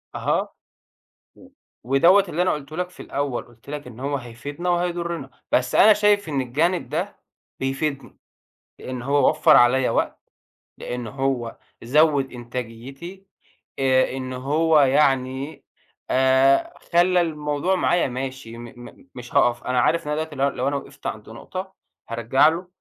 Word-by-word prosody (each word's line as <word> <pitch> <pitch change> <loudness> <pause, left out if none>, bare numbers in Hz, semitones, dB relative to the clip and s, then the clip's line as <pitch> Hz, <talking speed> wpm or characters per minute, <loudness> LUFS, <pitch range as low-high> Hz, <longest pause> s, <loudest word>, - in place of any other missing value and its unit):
أها، - - 0 0.9
و - - -17 0.4
ودوّة 170 +10 +5
اللي 175 +2 -1
أنا 185 - +2
قُلته 150 +1 -6
لك 180 0 -2
في - - -17
الأول، 140 -3 -3
قُلت 120 +3 -16
لك 150 -2 -6
إن 125 0 -11
هو 140 +1 -1
هيفيدنا 140 +8 -5
وهيضرنا، 170 -5 -2 0.2
بس 125 0 +1
أنا 215 - +7
شايف 205 -3 +2
إن 140 -3 -1
الجانب 160 +8 0
ده 180 +6 -3 0.4
بيفيدني، 135 +1 -3 0.6
لأن 130 -1 -6
هو 140 +2 +3
وفر 155 - +5
عليَّا 125 +2 +4
وقت، - - -1 0.6
لأن 120 -1 -5
هو 135 -2 -2 0.3
زوّد 145 +1 +3
إنتاجيتي، 125 +10 -8 0.5
آآ، 130 -1 +3
إن 130 0 -5
هو 150 +5 +2
يعني 135 0 +1 0.5
آآ، 130 +1 +3 0.2
خلّى 175 +1 +4
الموضوع 150 +2 -1
معايا 175 -3 +2
ماشي، 130 -2 -6
م 120 - -9 0.3
م - - -21
مش 125 -1 -10
هاقف، 120 0 +3
أنا 125 0 0
عارف 165 +5 +1
لو 150 - -1
أنا 155 +1 -1
دلوقتي 160 -2 -10
لو 140 +1 +2
لو 130 +1 -3
أنا 140 - 0
وقفت 140 0 -7
عنده 110 +1 -7
نقطة، 190 +9 -7 0.4
هارجع 120 +5 +3
له 175 +3 -5
140 Hz, 150 wpm, -23 LUFS, 130-165 Hz, 0.9 s, أنا